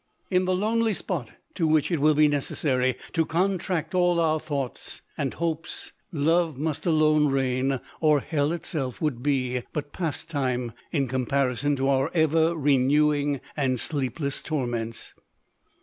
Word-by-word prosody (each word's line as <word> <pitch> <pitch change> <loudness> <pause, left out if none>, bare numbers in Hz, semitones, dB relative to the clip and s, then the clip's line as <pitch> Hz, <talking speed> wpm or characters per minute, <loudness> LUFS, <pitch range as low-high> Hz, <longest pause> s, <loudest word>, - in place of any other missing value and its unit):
— - - -40
In 185 - +2
the 185 0 +1
lonely 220 +2 +1
spot 150 - -3 0.2
to 165 - 0
which 155 +2 +2
it 165 - +1
will 155 +1 +4
be 150 +1 +6
necessary 130 -3 0 0.2
to 165 - +3
contract 175 -1 -1
all 175 -1 +3
our 155 -1 +2
thoughts 140 -5 -5
and 135 -2 -2
hopes, 165 -1 -3 0.2
love 160 -1 +1
must 155 +3 -2
alone 155 -2 +4
reign; 135 -1 +1 0.2
or 155 -2 +4
hell 145 +1 0
itself 155 -6 -3
would 145 -7 -1
be 125 -3 0
but 145 -1 -4
pastime 140 -7 -2 0.2
in 140 -4 +1
comparison 130 +2 0
to 135 0 0
our 135 +1 +2
ever 160 +1 +3
renewing 145 0 +2
and 130 -4 0
sleepless 140 +1 -2
torments. 120 -6 -3
150 Hz, 145 wpm, -26 LUFS, 135-160 Hz, 0.2 s, be